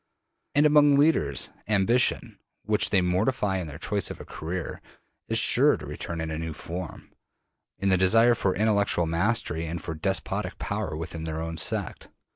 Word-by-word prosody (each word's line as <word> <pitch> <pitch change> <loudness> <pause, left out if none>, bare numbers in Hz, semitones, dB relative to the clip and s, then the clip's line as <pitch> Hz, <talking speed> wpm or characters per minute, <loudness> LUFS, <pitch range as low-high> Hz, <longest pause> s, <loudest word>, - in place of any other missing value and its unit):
And 145 +1 +5
among 145 -1 +6
leaders, 110 - +2 0.2
ambition, 110 +4 +1 0.2
which 105 0 +1
they 100 - +3
mortify 95 +2 0
in 85 - -5
their 75 - -8
choice - - -1
of - - -8
a - - -9
career, 85 +2 -6 0.5
is - - +1
sure - - +5
to - - -9
return 85 -1 -6
in 80 -1 -4
a 80 - -3
new 80 -1 -4
form: 85 +4 -7 0.7
in 100 - 0
the 95 - +4
desire 115 +6 +5
for 95 -5 0
intellectual 100 -4 +1
mastery 85 -1 -1
and 85 +2 -4
for 80 - -5
despotic 80 - -2
power 75 - -3
within 80 0 -6
their 80 0 -4
own 80 0 -5
sect. - - -3
95 Hz, 170 wpm, -26 LUFS, 80-110 Hz, 0.7 s, among